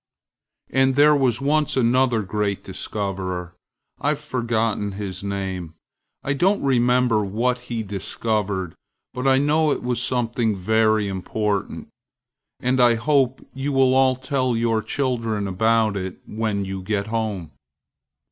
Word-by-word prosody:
And 135 0 +3
there 150 +1 +6
was 130 -5 +2
once 150 +1 +1
another 125 -2 +3
great 100 0 -2
discovererâI've 95 - -4
forgotten 115 -7 -1
his 100 -1 -6
name, 95 -4 -4 0.5
and - - -5
I - - +3
don't 190 +8 +2
remember 125 -4 +3
what 120 +6 0
he 115 -2 -2
discovered, 100 -2 -2 0.4
but 125 +2 -2
I 135 0 +5
know 150 +3 +2
it - - -2
was 125 -1 -1
something 120 -3 0
very 110 +2 +2
important, 100 +1 -2 0.7
and 125 0 +1
I 120 -1 +5
hope 135 +1 +1
you 135 +2 -3
will 130 -1 +4
all 130 -1 +4
tell 130 -2 -1
your 115 -1 +1
children 115 -6 -1
about 110 +2 +2
it 95 -1 -4
when 105 -2 -2
you 95 0 -5
get 100 +1 -1
home. 110 -7 -3
115 Hz, 130 wpm, -22 LUFS, 100-130 Hz, 0.7 s, there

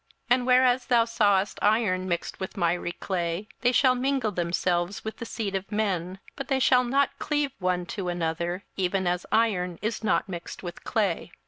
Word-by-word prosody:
27:002:043 - - +9
And 250 - -4
whereas 255 0 +4
thou 235 -2 +4
sawest 205 -4 +2
iron 205 -4 +2
mixed 170 -1 -3
with 190 - -6
miry 175 -1 0
clay, 175 +1 -3
they 245 - +3
shall 255 0 +4
mingle 255 -3 0
themselves 175 +2 -1
with 220 - -5
the 230 - -6
seed 205 -3 -3
of 195 +2 -4
men: 190 -4 -1 0.2
but 275 - -6
they 270 - +1
shall 250 -1 +5
not 275 +2 +1
cleave 295 -2 0
one 180 -1 0
to 190 -1 -4
another, 175 +2 -2
even 190 0 0
as 180 0 -1
iron 185 -6 +1
is 220 +1 -2
not 220 - +1
mixed 175 -1 -7
with 175 -1 -7
clay. 195 -6 -1
200 Hz, 185 wpm, -26 LUFS, 180-240 Hz, 0.2 s, 27:002:043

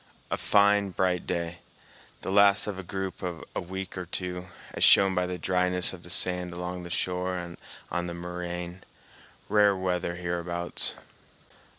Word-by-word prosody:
A - - +1
fine, 100 0 +4
bright 90 -1 0
day, 85 0 -2 0.6
the - - -3
last 100 0 +6
of 100 -3 -4
a - - -5
group 95 +1 -4
of 90 -3 -4
a - - 0
week 95 +1 -6
or 90 - -5
two, 90 0 -4 0.3
as - - -1
shown 95 -1 +7
by 90 -1 +1
the 90 0 -3
dryness 90 +1 +1
of 90 - -9
the 85 - -11
sand 90 0 0
along 90 +1 -4
the 85 - -8
shore 90 +1 -1
and 85 -1 -6 0.4
on 90 0 -1
the 85 - -5
moraine—rare 90 +3 -2
weather 90 -2 -1
hereabouts. 85 0 0
90 Hz, 160 wpm, -28 LUFS, 85-95 Hz, 0.6 s, shown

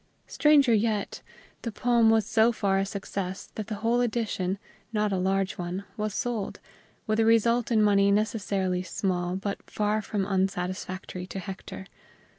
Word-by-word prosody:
Stranger 290 -5 +4
yet, 215 -1 0 0.4
the 230 - -4
poem 235 0 +3
was 220 -2 +4
so 225 +1 +4
far 195 -4 +1
a 195 - +1
success 195 -1 -5
that 215 -2 -5
the 215 - -3
whole 240 +2 +3
edition, 215 -5 -1 0.3
not 210 -2 0
a - - +1
large 190 +1 0
one, 180 +2 -3
was 215 -1 -3
sold, 230 -5 -2 0.5
with 215 +1 0
a - - +5
result 230 +1 +3
in 220 -2 +4
money 200 -1 +4
necessarily 200 -3 0
small 180 -1 -2
but 200 +1 -3
far 210 +1 0
from 205 -2 -2
unsatisfactory 185 -1 -2
to 195 - -7
Hector. 190 0 -7
205 Hz, 155 wpm, -27 LUFS, 190-225 Hz, 0.5 s, a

